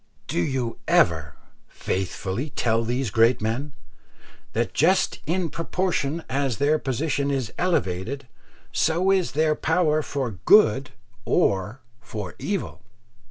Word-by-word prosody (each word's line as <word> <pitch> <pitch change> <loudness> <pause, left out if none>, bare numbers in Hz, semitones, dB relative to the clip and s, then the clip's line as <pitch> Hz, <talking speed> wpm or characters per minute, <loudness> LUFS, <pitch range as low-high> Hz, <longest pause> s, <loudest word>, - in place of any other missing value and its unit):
Do - - -2
you 125 +1 -2
ever 80 -4 +2 0.3
faithfully 95 - -3
tell 115 -3 0
these 120 0 -1
great 115 +3 +4
men, 120 +7 -3 0.8
that 115 +1 -1
just 180 +7 +2
in 170 -1 0
proportion 165 -2 -1
as 135 -3 -1
their 150 +3 +2
position 140 +1 -1
is 135 -5 -2
elevated, 135 - -1 0.4
so 175 +4 +2
is 190 -3 +1
their 155 +1 +3
power 160 -1 +1
for 135 -5 -3
good 140 -11 +5 0.3
or 100 +6 +1 0.2
for 105 -5 -6
evil? 200 -2 -3
135 Hz, 115 wpm, -24 LUFS, 115-160 Hz, 0.8 s, good